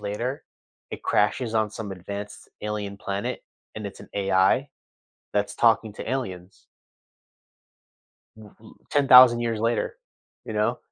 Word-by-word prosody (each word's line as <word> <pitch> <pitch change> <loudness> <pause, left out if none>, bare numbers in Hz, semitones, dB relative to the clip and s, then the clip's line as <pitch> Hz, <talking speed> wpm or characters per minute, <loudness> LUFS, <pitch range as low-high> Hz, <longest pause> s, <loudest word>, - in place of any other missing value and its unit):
later, 120 +7 -4 0.5
it - - -7
crashes 115 -3 +1
on 110 -1 +1
some 105 -2 -6
advanced 100 +3 -8
alien 105 -1 -4
planet, 100 0 -4 0.3
and 110 -1 -5
it’s 100 - -9
an - - -13
AI 95 +7 +2 0.6
that’s 105 0 -1
talking 115 -2 +3
to 110 - -6
aliens. 95 -9 -5 1.7
Mhm, 110 0 -16 0.2
10,000 130 -4 +7
years 115 -2 -2
later, 115 - -1 0.5
you - - -6
know? - - 0
105 Hz, 120 wpm, -25 LUFS, 100-120 Hz, 1.7 s, 10,000